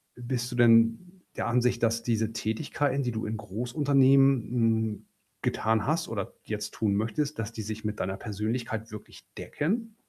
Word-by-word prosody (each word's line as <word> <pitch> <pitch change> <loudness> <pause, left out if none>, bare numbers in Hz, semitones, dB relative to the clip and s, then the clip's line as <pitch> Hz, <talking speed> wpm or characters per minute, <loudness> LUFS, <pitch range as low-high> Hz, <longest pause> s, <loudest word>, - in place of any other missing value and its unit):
bist 120 0 -3
du - - -4
denn 120 +10 +4
der - - -2
Ansicht, 125 0 +1
dass 115 0 +1
diese 115 -2 0
Tätigkeiten, 135 +5 -1
die 125 - -1
du 110 -1 -3
in 110 +1 -3
Großunternehmen, 135 +5 +3
hm, 110 -3 +1 0.4
getan 110 0 +1
hast 160 +2 0
oder 105 -1 -4
jetzt 105 -1 -4
tun 105 -3 0
möchtest, 115 +7 -1
dass 115 0 -3
die 110 - -5
sich 110 +1 -6
mit 105 0 -3
deiner 95 +1 -2
Persönlichkeit 110 +1 -3
wirklich 105 - -11
decken? 220 +9 -2
115 Hz, 160 wpm, -28 LUFS, 110-130 Hz, 0.4 s, denn